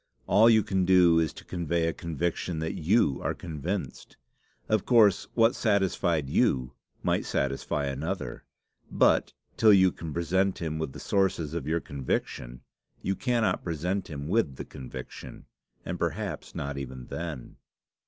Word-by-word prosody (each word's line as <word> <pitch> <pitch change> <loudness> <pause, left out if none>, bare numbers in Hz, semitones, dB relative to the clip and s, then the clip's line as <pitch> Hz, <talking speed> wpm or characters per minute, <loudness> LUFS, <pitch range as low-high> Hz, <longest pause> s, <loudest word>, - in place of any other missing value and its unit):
All 110 +4 +6
you 110 -2 +5
can 95 -1 0
do 90 -2 +5
is 80 -2 +1
to - - -12
convey 85 -1 -1
a 80 - 0
conviction 85 +1 -3
that 80 +1 -2
you 80 - +2
are - - -1
convinced. 85 +4 -5 0.5
Of 110 -2 +2
course, 105 -6 +4
what 115 0 +5
satisfied 95 - +1
you 65 -2 +1 0.3
might - - +1
satisfy 70 +1 -1
another; 70 0 -4 0.5
but, - - +3 0.3
till 110 - +6
you 95 -2 +6
can 80 -2 -7
present 90 +4 +1
him 80 -2 -3
with 80 -4 -3
the - - -9
sources 90 -6 0
of 85 - -4
your 80 +1 0
conviction, 60 -2 -4 0.4
you 95 - 0
cannot 120 -2 0
present 90 +4 -2
him 70 -2 -5
with 95 -7 +1
the - - -7
conviction 65 -1 -9 0.4
and - - -4
perhaps - - -3
not 70 0 -4
even 65 -2 -7
then." 80 -7 -6
85 Hz, 150 wpm, -28 LUFS, 70-95 Hz, 0.5 s, All